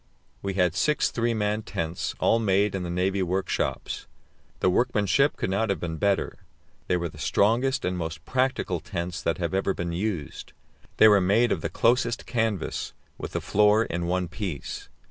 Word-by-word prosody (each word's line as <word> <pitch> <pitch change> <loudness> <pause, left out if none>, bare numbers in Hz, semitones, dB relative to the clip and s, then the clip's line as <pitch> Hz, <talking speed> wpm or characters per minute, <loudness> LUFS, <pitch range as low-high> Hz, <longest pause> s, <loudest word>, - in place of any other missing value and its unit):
We 100 -1 -3
had 90 -3 +2
six 150 - +1
three 115 0 0
man 105 0 0
tents, 85 -3 -3
all 115 - +3
made 100 -1 +2
in 95 - -2
the 90 - -4
navy 95 +3 0
workshops. 95 +1 -2 0.5
The - - +2
workmanship 105 +7 +2
could - - -2
not 105 +3 0
have 100 - 0
been 80 -2 -4
better; 100 +3 0 0.5
they 90 - +2
were 85 0 -2
the 75 -2 -12
strongest 120 - +2
and 90 0 -1
most 80 -1 -5
practical 130 0 0
tents 85 +2 -4
that 85 - 0
have 85 0 -2
ever 95 0 +1
been 85 -1 -3
used. 85 -5 -4 0.4
They 110 - +8
were 105 -2 +6
made 110 +6 +3
of - - 0
the - - -2
closest 120 0 +1
canvas, 110 -7 -2 0.3
with - - -6
the - - -1
floor 105 +2 +4
in 85 0 -3
one 90 0 0
piece. 90 -4 -5
95 Hz, 180 wpm, -26 LUFS, 90-110 Hz, 0.5 s, They